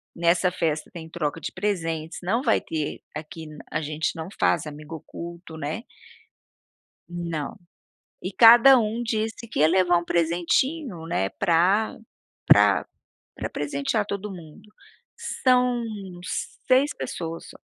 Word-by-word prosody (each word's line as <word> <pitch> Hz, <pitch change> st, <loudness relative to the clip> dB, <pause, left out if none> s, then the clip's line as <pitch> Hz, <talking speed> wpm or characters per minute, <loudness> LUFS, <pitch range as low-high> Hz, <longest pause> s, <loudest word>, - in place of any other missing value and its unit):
nessa 170 Hz, +2 st, +2 dB
festa 160 Hz, -4 st, -1 dB
tem 160 Hz, -2 st, -9 dB
troca 165 Hz, -1 st, -3 dB
de -, -, -5 dB
presentes, 165 Hz, -6 st, -2 dB
não 225 Hz, +7 st, +1 dB
vai -, -, +3 dB
ter 155 Hz, -2 st, -4 dB
aqui 160 Hz, +1 st, -7 dB, 0.2 s
a -, -, -1 dB
gente 155 Hz, +3 st, -2 dB
não 160 Hz, 0 st, -5 dB
faz 160 Hz, -, +2 dB
amigo 150 Hz, +2 st, -8 dB
oculto, 170 Hz, +1 st, -9 dB
né. 155 Hz, +9 st, -4 dB, 1.3 s
Não. 170 Hz, -4 st, -4 dB, 0.7 s
E 185 Hz, -, -4 dB
cada 240 Hz, +4 st, +8 dB
um 225 Hz, +1 st, -1 dB
disse 225 Hz, 0 st, -2 dB
que 225 Hz, -, -3 dB
ia 155 Hz, -, +6 dB
levar 175 Hz, 0 st, +4 dB
um 170 Hz, -, -4 dB
presentinho, 175 Hz, -, 0 dB
né, 95 Hz, -, 0 dB
pra 175 Hz, -, +2 dB, 0.5 s
pra -, -, +6 dB, 0.5 s
pra -, -, -4 dB
presentear 275 Hz, -7 st, -1 dB
todo 200 Hz, 0 st, -4 dB
mundo, 180 Hz, +3 st, -12 dB, 0.7 s
são 250 Hz, -1 st, +3 dB, 0.9 s
6 270 Hz, +3 st, +4 dB
pessoas 165 Hz, -1 st, -5 dB
só. -, -, -14 dB
175 Hz, 130 wpm, -25 LUFS, 160-220 Hz, 1.3 s, cada